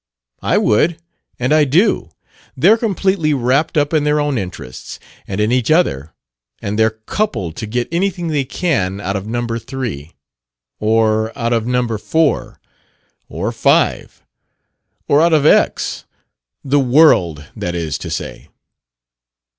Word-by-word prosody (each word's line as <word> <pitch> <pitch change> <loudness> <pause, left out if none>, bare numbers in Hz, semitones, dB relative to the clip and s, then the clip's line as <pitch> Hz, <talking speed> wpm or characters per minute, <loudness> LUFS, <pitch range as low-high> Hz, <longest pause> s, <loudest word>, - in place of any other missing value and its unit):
"I - - +1
would. 155 +10 +2 0.4
And 125 +4 0
I 155 -1 +5
do. 155 - +2 0.5
They're 220 - +5
completely 190 -8 0
wrapped 135 +5 +1
up 145 +1 +1
in 155 -2 +2
their 150 0 +2
own 145 -1 0
interests, 70 -9 -8 0.3
and 95 +1 -4
in 105 +2 +1
each 125 -2 +1
other; 80 - +1 0.4
and 105 +2 -3
they're 110 0 +2
coupled 100 - -2
to 110 - -5
get 120 +3 -2
anything 175 -1 -1
they 145 -3 0
can 125 - -1
out 100 0 -3
of 100 +1 -4
Number 115 0 -2
Three. 115 - -6 0.7
Or 110 0 +1
out 115 0 0
of 115 0 0
Number 125 -3 -1
Four. 160 +7 0 0.7
Or - - -3
Five. - - +1 0.8
Or 145 +2 +4
out 170 0 +3
of 150 -2 +3
X, - - +2 0.6
the 145 +1 +2
world, 120 - +3
that 90 0 -4
is 80 -5 -3
to - - -6
say." - - -6
125 Hz, 140 wpm, -17 LUFS, 105-155 Hz, 0.8 s, I